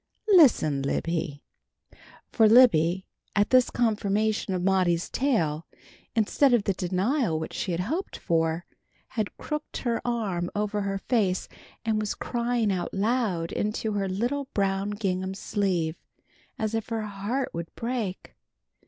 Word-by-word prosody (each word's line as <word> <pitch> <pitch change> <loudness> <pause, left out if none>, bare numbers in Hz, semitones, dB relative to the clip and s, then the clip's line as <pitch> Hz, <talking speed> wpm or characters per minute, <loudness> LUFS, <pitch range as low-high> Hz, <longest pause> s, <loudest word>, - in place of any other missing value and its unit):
Listen, 220 - +5
Libby!" 145 +1 -2 0.9
For 220 -2 +5
Libby, 190 -7 +5 0.3
at 205 0 +2
this 255 -1 +5
confirmation 215 -3 0
of 180 - -2
Maudie's 180 -3 +2
tale, 165 - 0 0.5
instead 245 +4 +4
of 225 - +1
the 200 - +1
denial 190 - 0
which 160 - -5
she 190 -7 -2
hoped 295 - -3
for, 165 +1 0 0.4
had 215 -4 -3
crooked 300 0 -5
her 235 -2 0
arm 200 -8 -1
over 210 0 -1
her 195 0 -1
face, 195 -4 0 0.4
and 220 -1 +1
was 210 -1 -2
crying 235 -3 0
out 185 0 -3
loud 200 -5 0
into 215 +1 -1
her 200 -2 -1
little 245 +9 -1
brown 195 0 +1
gingham 190 -2 -2
sleeve, 180 -5 -1 0.6
as 220 0 -2
if 225 0 -2
her 225 -1 -2
heart 210 +6 -3
would 170 0 -5
break. 230 -6 -4
205 Hz, 135 wpm, -27 LUFS, 180-230 Hz, 0.9 s, Listen